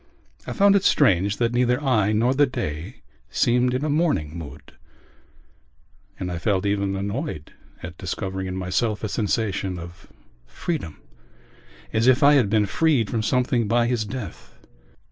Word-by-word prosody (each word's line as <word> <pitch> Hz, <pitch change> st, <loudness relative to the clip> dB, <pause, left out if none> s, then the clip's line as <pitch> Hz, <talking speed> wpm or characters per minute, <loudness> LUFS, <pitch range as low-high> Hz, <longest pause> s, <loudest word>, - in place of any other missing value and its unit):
I -, -, -3 dB
found 200 Hz, 0 st, +4 dB
it 195 Hz, -, +2 dB
strange 100 Hz, -, +3 dB
that 120 Hz, -1 st, 0 dB
neither 125 Hz, 0 st, +2 dB
I 110 Hz, -8 st, +2 dB
nor 115 Hz, +4 st, +2 dB
the 145 Hz, +1 st, +3 dB
day 85 Hz, -, -5 dB, 0.3 s
seemed 125 Hz, +1 st, +2 dB
in 135 Hz, +4 st, -1 dB
a -, -, 0 dB
mourning 145 Hz, -, 0 dB
mood 80 Hz, -4 st, -10 dB, 1.5 s
and 90 Hz, -1 st, -3 dB
I 85 Hz, -, -4 dB
felt 100 Hz, 0 st, 0 dB
even 100 Hz, -1 st, 0 dB
annoyed 100 Hz, -, -4 dB, 0.3 s
at 85 Hz, +1 st, -8 dB
discovering 95 Hz, 0 st, -4 dB
in 95 Hz, 0 st, -4 dB
myself 105 Hz, +4 st, -1 dB
a -, -, 0 dB
sensation 100 Hz, -3 st, -1 dB
of 85 Hz, 0 st, -11 dB, 0.4 s
freedom 80 Hz, -, -4 dB, 1.0 s
as 115 Hz, +2 st, +2 dB
if 130 Hz, +3 st, +4 dB
I 145 Hz, +1 st, +7 dB
had 125 Hz, -8 st, +3 dB
been 105 Hz, 0 st, +2 dB
freed 135 Hz, 0 st, +1 dB
from 115 Hz, -, 0 dB
something 125 Hz, 0 st, +1 dB
by 120 Hz, +2 st, +2 dB
his 120 Hz, -2 st, 0 dB
death. 105 Hz, -3 st, -8 dB
110 Hz, 155 wpm, -23 LUFS, 95-125 Hz, 1.5 s, I